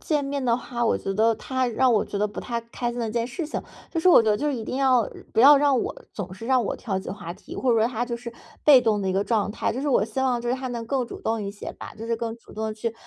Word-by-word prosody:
见 295 -3 0
面 280 0 -2
的 235 -2 +2
话， 240 -1 -3
我 - - +2
觉 195 - -3
得 225 +3 +3
他 260 +3 -2
让 245 +2 +2
我 215 - +3
觉 - - -6
得 210 - +2
不 210 - -7
太 235 -2 -3
开 240 +1 -4
心 240 - -6
的 230 - -1
一 - - -5
件 235 -1 0
事 305 +6 -4
情， - - -4 0.3
就 330 - -1
是 365 - +4
我 350 - +8
觉 220 - +2
得， 210 - +3
就 295 - -2
是 285 - 0
一 230 -3 -5
定 255 - -4
要 255 -5 +3 0.3
不 - - +4
要 285 +4 +9
让 280 -2 +3
我 - - -3 0.2
总 190 -3 -6
是 210 +5 -8
让 255 -2 +3
我 - - -2
挑 195 -5 -3
起 190 - -6
话 170 -3 -6
题， - - -11
或 255 -2 +1
者 230 - +3
说 220 - +4
他 245 -1 -2
就 240 -1 -4
是 235 0 -8 0.3
被 285 -4 +8
动 220 -3 +1
的 190 - -1
一 - - +1
个 195 +1 +1
状 210 -2 0
态。 - - -1
就 255 - -4
是 290 - -1
我 260 - +3
希 225 +4 -4
望， 255 -2 +1
就 240 - -4
是， 250 - +2
他 260 0 -4
能 235 -2 -4
更 260 -2 0
主 - - -9
动 225 0 -1
一 200 -1 -4
些 205 - -7
吧， - - -10
就 225 +1 -8
是 230 0 0
更 230 -1 -3
主 - - -17
动 220 - -4
地 215 - -4
去 225 +1 -3
235 Hz, 360 characters per minute, -25 LUFS, 220-260 Hz, 0.3 s, 要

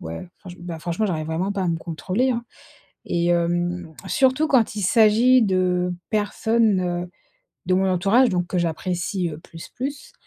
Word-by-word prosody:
ouais, 80 - -7
franche 180 -2 -12
bah, 175 -2 -7
franchement, 170 +7 -2
j'arrive 155 -5 -2
vraiment 165 +5 -2
pas 200 -2 -2
à 180 - 0
me 165 -1 -1
contrôler, 185 +10 -1
hein. 235 -1 -2 0.6
Et 170 0 -1
hem, 175 0 0
surtout 265 +3 +2
quand 240 -7 +2
il 205 - -3
s'agit 230 +5 +5
de 180 -3 +1 0.2
personnes, 215 0 +1
heu, 175 0 -3 0.6
de 185 - +2
mon 190 +1 +2
entourage, 200 +8 +3
donc 180 -1 -1
que 180 - -4
j'apprécie, 175 +2 -2
heu, 150 - -8
plus, 165 0 -12
plus. 280 +3 -6
185 Hz, 170 wpm, -22 LUFS, 175-220 Hz, 0.6 s, s'agit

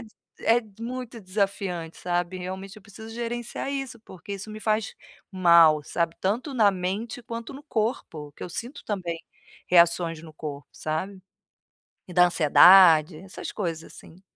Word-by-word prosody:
d 230 - -13 0.3
é 230 +2 +3 0.2
muito 245 -1 -6
desafiante, 185 -4 -2
sabe. 175 +1 -2
Realmente 190 +3 -7
eu 215 - -14
preciso 220 +2 -12
gerenciar 240 +2 -4
isso, 270 -4 -5
porque 195 -2 -10
isso 200 +2 -7
me 215 - -7
faz 215 -1 -1 0.4
mal, 170 -5 +5
sabe, 170 +1 -2
tanto 230 +9 -1
na 220 -6 +4
mente 200 +7 -4
quanto 230 +2 -7
no 280 - -10
corpo, 215 - -3
que - - -12
eu - - -5
sinto 235 - -7
também 175 -5 -4 0.5
reações 170 -2 +3
no 160 - -12
corpo, 145 -2 -7
sabe. 185 +5 -4 0.8
E 180 - -11
da 180 0 +6
ansiedade, 170 -1 +6
essas 195 0 -8
coisas 165 -6 -3
assim. 180 +4 -13
190 Hz, 150 wpm, -25 LUFS, 170-225 Hz, 0.8 s, da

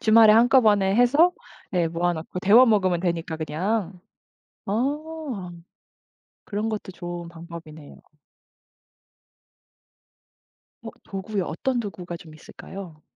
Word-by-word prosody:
주말에 220 -1 +7
한꺼번에 215 -5 +4
해서 285 +9 +5 0.4
네 175 -2 +1
모아놓고 170 +1 -2
데워 215 +7 +7
먹으면 185 -6 +2
되니까 170 -2 -2
그냥. 180 +4 -2 0.7
어 275 - -3 0.9
그런 210 +2 -3
것도 210 -3 -5
좋은 175 -1 -7
방법이네요. 165 -3 -11 2.9
어 - - -7 0.2
도구요. 195 0 -4
어떤 255 +10 -2
도구가 180 -5 -6
좀 160 -2 -14
있을까요? 165 0 -11
190 Hz, 230 characters per minute, -24 LUFS, 170-225 Hz, 2.9 s, 주말에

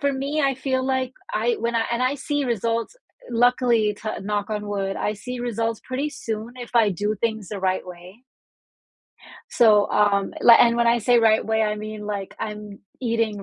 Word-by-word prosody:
for 280 0 +1
me, 280 +3 -2
I 275 -2 +2
feel 260 0 -1
like 260 -1 -1 0.2
I 475 -2 +1
when 235 0 -1
I 225 -1 +2
and 235 +2 0
I 255 +2 +1
see 290 +1 -2
results 230 - -2 0.3
luckily 240 -2 +3
to 215 - -4
knock 205 +1 -2
on 210 -1 -3
wood, 195 -1 -2
I 210 - -1
see 250 +5 -7
results 230 -2 -2
pretty 265 +3 -2
soon 225 -2 -5
if 245 -1 -8
I 225 -3 +5
do 205 +3 -1
things 220 -4 -2
the 205 -2 -6
right 185 -1 -1
way. 180 +5 -12 1.3
So, 210 -4 +5
um, 200 -1 +2
li 235 - +8
and 235 -1 +5
when 235 0 +2
I 235 +1 +4
say 240 +2 +3
right 220 -1 +3
way, 220 0 +1
I 210 -1 0
mean, 215 0 -7
like, 200 -2 -5
I'm 210 -2 -6 0.2
eating 230 -4 -1
225 Hz, 190 wpm, -23 LUFS, 210-245 Hz, 1.3 s, li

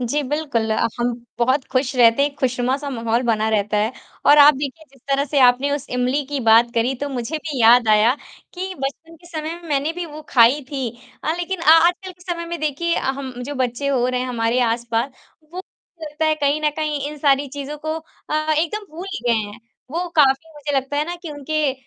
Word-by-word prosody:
जी, 250 +5 -1
बिल्कुल 280 -5 -2
अ, - - +1
हम 240 +1 +1 0.3
बहुत 260 +3 +2
खुश 260 +1 0
रहते 235 +2 +5
हैं 285 - +3
एक 280 - -25
खुशनुमा-सा 260 +2 -1
माहौल 230 -1 -1
बना 220 -3 +1
रहता 210 -1 0
है 215 +3 +1 0.3
और 290 +1 +7
आप 295 +1 +8
देखिए 285 +3 -5
जिस 270 - -22
तरह 275 0 +2
से 285 0 -1
आपने 255 +2 +4
उस 285 -1 -4
इमली 250 +3 0
की 285 0 -3
बात 230 0 +5
करी 235 +3 +1
तो 285 - -1
मुझे 260 +3 -3
भी 300 -4 -5
याद 235 +1 +6
आया 215 +3 +5 0.4
कि 375 +1 -5
बचपन 325 +3 -6
के 345 +2 -19
समय 320 -1 -5
में 340 - -12
मैंने 290 +2 0
भी 350 0 -5
वो 305 0 -10
खाई 245 +4 +5
थी 270 -4 -2 0.4
अ, 315 - +1
लेकिन 355 +1 -3
अ, - - -5
आजकल 350 +3 +4
के 355 0 -20
समय 340 0 -5
में 340 0 -5
देखिए 310 +3 -1
अ, - - -2
हम 265 -1 -6
जो 285 +4 -5
बच्चे 255 +1 -1
हो 255 -3 +1
रहे 250 0 -1
हैं 255 - -2
हमारे 235 0 0
आसपास 235 +2 -1 0.4
वो 365 +1 -6 0.4
लगता 305 +1 -3
है 310 0 +3
कहीं 290 0 0
न 300 - +3
कहीं 305 -2 -2
इन 300 - -8
सारी 280 -1 +2
चीज़ों 285 +2 -6
को 315 +1 -3 0.4
अ, 310 +1 +1
एकदम 415 +7 -1
भूल 350 +4 -7 0.2
गए 240 - +4
हैं। 215 -1 -2 0.3
वो 345 +4 -2
काफ़ी 290 +2 +3
मुझे 290 -1 -3
लगता 270 +2 -2
है 295 - +1
ना 345 +2 -5
कि 335 - -6
उनके 295 0 -1
280 Hz, 220 wpm, -21 LUFS, 245-310 Hz, 0.4 s, आप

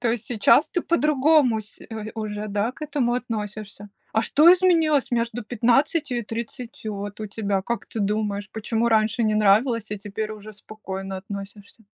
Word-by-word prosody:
То 240 -2 +1
есть 230 -1 -2
сейчас 245 +6 +4
ты 350 - 0
по-другому, 300 -6 +3
се 210 - -14
ой, 220 -1 -6
уже, 215 -1 -4
да, 205 +3 0
к 295 - -13
этому 280 -5 0
относишься? 210 -4 -5 0.2
А 220 - +2
что 310 +9 +6
изменилось 330 -7 +3
между 235 -1 -1
15 250 +4 +1
и - - -3
30 230 0 -6
вот 205 +1 -6
у 215 - -3
тебя? 200 -2 -2
Как 235 0 -3
ты 225 - -4
думаешь, 205 0 -1
почему 225 +1 -1
раньше 220 +1 +2
не 215 -1 +2
нравилось, 215 +2 +3
а 210 - -3
теперь 210 +2 -5
уже 215 0 -10
спокойно 195 -2 -7
относишься? 200 +3 -9
220 Hz, 170 wpm, -24 LUFS, 210-245 Hz, 0.2 s, что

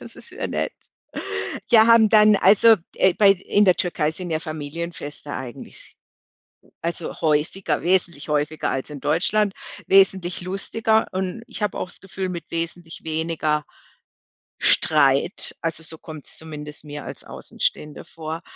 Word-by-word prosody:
Das - - -12
ist - - -13
ja - - -4
nett. - - -2 1.0
Ja, 220 -2 +7
haben 230 -2 +6
dann, 215 -1 +6
also 215 +4 +6 0.2
äh, 190 -2 +3
bei 200 -2 +6
in 200 +2 +1
der 185 -2 +5
Türkei 165 -4 0
sind 175 +1 -6
ja 155 - 0
Familienfeste 155 -1 -6
eigentlich, 125 -3 -9 0.9
also 170 0 -4
häufiger 155 +4 0
wesentlich 170 -4 0
häufiger 150 +1 -1
als 135 +3 -3
in 145 - -8
Deutschland, 195 - +1 0.3
wesentlich 190 -2 +3
lustiger 220 +4 0
und 185 +4 -3
ich 245 - -8
habe 210 - -1
auch's 180 - -5
Gefühl, 190 -1 -5
mit 175 -2 -5
wesentlich 165 0 -5
weniger 155 -1 -1 1.0
Streit. 140 +1 +4
Also 165 -1 -2
so 160 0 -5
kommt's 155 -2 -8
zumindest 150 -1 -8
mir 145 -1 -7
als - - -9
Außenstehender 150 -1 -4
vor. 160 +1 -7
170 Hz, 140 wpm, -22 LUFS, 155-190 Hz, 1.0 s, Ja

